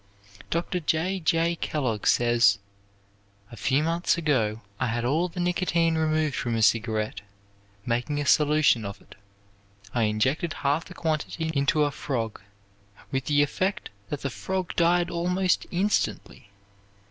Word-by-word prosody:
Dr. 175 +2 -1
J. 170 +4 0
J. 165 0 +1
Kellogg 125 -11 -2
says: 120 -4 +4 0.9
"A - - -9
few 135 +7 +1
months 170 +2 +1
ago 115 -9 0 0.2
I 130 - 0
had 120 +1 -2
all 155 +8 +1
the 180 +1 -8
nicotine 175 -2 +1
removed 155 -2 +1
from 120 -2 -2
a 110 - +1
cigarette, 110 -1 +1 0.6
making 125 +5 -1
a 145 - -2
solution 150 -6 +4
of 100 0 -6
it. - - -17 0.8
I 115 -2 +2
injected 130 +10 0
half 145 +4 +1
the - - -12
quantity 160 0 -2
into 140 +1 +2
a 145 - +1
frog, 115 -8 -4 0.7
with 135 -1 -1
the 145 -1 +3
effect 185 +7 -2 0.2
that 145 - -4
the 140 - -3
frog 190 +3 -3
died 175 0 +3
almost 180 +2 0
instantly. 185 - -1
150 Hz, 140 wpm, -26 LUFS, 120-170 Hz, 0.9 s, says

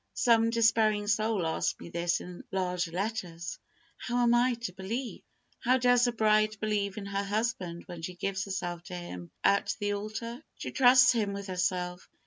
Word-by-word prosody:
Some 230 -1 +4
despairing 220 -2 +3
soul 215 -3 +1
asked 160 - -1
me - - -9
this 170 +1 0
in 180 0 -9
large 180 -2 -1
letters, 175 -2 -4 0.4
"How 245 0 -1
am 235 0 +4
I 245 +1 +3
to 230 -6 -5
believe?" 225 +7 -5 0.4
How 255 +2 +3
does 245 0 +4
a - - +1
bride 215 -1 +2
believe 205 -2 -1
in 205 - -5
her 200 0 -2
husband 200 -5 -2
when 175 -2 -8
she 180 +2 -5
gives 190 +1 -2
herself 175 -3 -4
to 180 - -7
him 90 - -7
at 200 0 +3
the 205 -1 0
altar? 225 +6 -5
She - - -5
trusts 255 -1 +7
him 215 -5 0
with 200 0 -5
herself. 180 -1 -2
205 Hz, 175 wpm, -29 LUFS, 180-230 Hz, 0.4 s, trusts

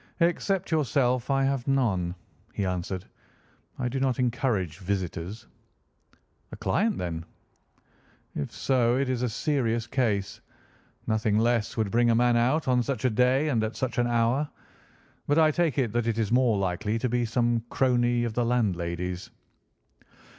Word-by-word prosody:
"Except 180 +2 +1
yourself 130 -5 +1
I 135 0 +2
have 135 -2 -1
none," 100 -11 +1 0.4
he 100 - -1
answered. 90 0 -3 0.7
"I 125 - -1
do 130 +2 -2
not 130 -2 +1
encourage 115 - -1
visitors." 95 +2 -4 1.1
"A - - -8
client, 210 +3 0
then?" 85 -2 -4 1.1
"If 70 - -4
so, 125 -2 +1
it 135 -1 0
is 125 -2 -1
a 125 - 0
serious 115 -3 0
case. 105 -6 -1 0.6
Nothing 110 -1 +1
less 115 -1 +1
would 110 -3 0
bring 120 +1 +3
a 115 - +4
man 120 +1 +3
out 130 +7 +2
on 125 -1 +3
such 125 -1 -3
a 130 - +3
day 125 +6 +3
and 115 -6 +1
at 110 +1 -3
such 130 -1 -2
an 120 - +2
hour. 120 +5 +1 0.8
But 145 - +2
I 155 -1 +5
take 165 -3 0
it 125 -6 +1
that 120 0 -1
it 115 -1 0
is 110 -2 -1
more 125 -3 +3
likely 100 +3 -1
to 125 - -1
be 120 0 0
some 120 0 +1
crony 120 -2 +2
of 115 -2 -2
the 120 - +1
landlady's." 90 -6 -1
120 Hz, 160 wpm, -27 LUFS, 105-130 Hz, 1.1 s, I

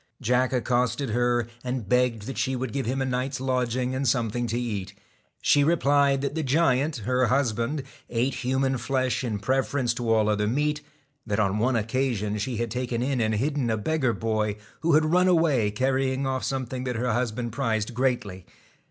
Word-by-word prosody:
Jack 125 +2 +1
accosted 125 0 0
her, 120 0 +1 0.2
and 125 -4 -3
begged 125 -1 +2
that 135 +5 -5
she 130 -1 0
would 125 -3 -4
five 135 -4 -2
him 135 +2 0
a - - -1
night's 130 +1 -2
lodging 125 -1 -1
and 135 +1 -1
something 120 0 0
to 115 +1 -1
eat. 105 -6 -4 0.5
he 145 - +4
replied 140 -3 +3
that 140 0 -2
the 160 - -1
giant, 145 0 +2
her 125 0 +2
husband, 125 +2 0 0.3
ate 125 +3 0
human 130 +1 0
flesh 130 0 0
in 115 -4 -2
preference 130 +2 0
to 120 -1 -2
all 110 -1 +3
other 105 0 +1
meat; 150 +5 0 0.5
that 105 0 0
on 105 0 +1
one 125 +3 +2
occasion 110 -2 -1
she 120 +3 -2
had 120 -1 -2
taken 125 -1 -2
in 130 -2 0
and 110 -1 +1
hidden 135 +2 0
a 110 - +1
beggar 135 +2 0
boy, 110 -2 -1 0.2
who 165 0 +1
had 155 +1 +5
run 180 +4 +3
away 160 - +3
carrying 130 +4 0
off 130 -1 -1
something 130 -1 -3
that 125 -1 -2
her 125 +1 0
husband 120 0 -2
prized 110 0 -1
greatly. 120 -7 -1
125 Hz, 185 wpm, -26 LUFS, 115-135 Hz, 0.5 s, had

